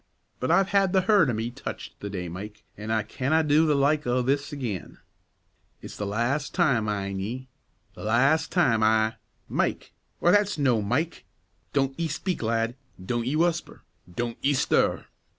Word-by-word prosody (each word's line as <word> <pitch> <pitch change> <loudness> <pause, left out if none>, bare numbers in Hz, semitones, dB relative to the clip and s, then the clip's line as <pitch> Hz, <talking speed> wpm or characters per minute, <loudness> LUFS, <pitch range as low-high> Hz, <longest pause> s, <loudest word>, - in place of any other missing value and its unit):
But 130 - -2
I've 190 +3 +4
had 195 -2 +2
the 190 - +4
hert 195 -6 +4
o' - - 0
me 110 +2 -2
touched 135 +3 -8
the 100 - -5
day, 90 -3 -4
Mike, 100 +5 -8
an' 105 +1 -7
I 110 -1 +1
canna 140 +9 0
do 155 +2 +4
the 150 - +3
like 145 +1 +2
o' 125 +1 +1
this 140 +3 0
again; 120 - -5 0.8
it's - - -10
the 105 - -4
las' 120 +8 -1
time, 135 - +2
min' 100 -2 -2
ye, 125 +7 -5 0.4
the - - -10
las' 135 +9 +3
time 125 -12 +2
I 110 0 +3 0.3
Mike! - - -2 0.2
why, 175 - +3
that's 205 -2 +3
no' 130 -6 +2
Mike! 125 +11 -2 0.5
Don't 135 0 0
ye 165 - 0
speak, 175 +4 -3
lad! 115 +1 0 0.3
don't 120 +2 -1
ye 140 - 0
whusper! 170 +1 0 0.3
don't 120 +5 -4
ye 140 +1 +3
stir!" 135 - +1
130 Hz, 175 wpm, -26 LUFS, 110-155 Hz, 0.8 s, I've